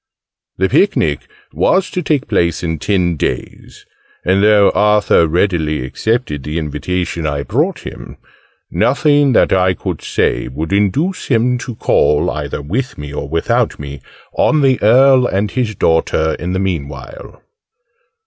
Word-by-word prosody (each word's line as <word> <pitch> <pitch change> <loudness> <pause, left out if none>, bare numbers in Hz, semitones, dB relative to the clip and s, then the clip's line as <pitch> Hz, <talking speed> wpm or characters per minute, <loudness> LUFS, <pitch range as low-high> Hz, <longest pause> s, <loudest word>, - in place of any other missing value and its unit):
The - - +2
picnic - - +1 0.2
was 190 0 +1
to 180 - -2
take 145 -3 -1
place 85 0 0
in 80 -2 -2
ten 85 -1 0
days: - - -5 0.4
and 95 +2 +2
though 105 -1 +5
Arthur 105 -5 +3
readily 80 -5 0
accepted 110 - -2
the 75 +4 -5
invitation 85 +2 -3
I 70 -1 -2
brought 155 - -1
him, - - -9 0.5
nothing 145 0 +2
that - - +3
I 95 -1 +2
could - - -5
say - - -1
would 80 +8 -4
induce 120 - 0
him 125 0 +1
to 125 -1 -7
call 75 -7 +2
either 70 - -5
with 120 - -3
me 75 0 -8
or 70 -1 -5
without 80 +2 0
me 70 -1 -8 0.3
on 155 -2 +2
the 135 -2 +3
Earl 130 +3 +5
and 100 +2 -1
his 120 -5 -2
daughter 80 -2 +1
in 90 +1 -3
the 95 - -1
meanwhile. 95 - -6
95 Hz, 145 wpm, -16 LUFS, 80-125 Hz, 0.5 s, though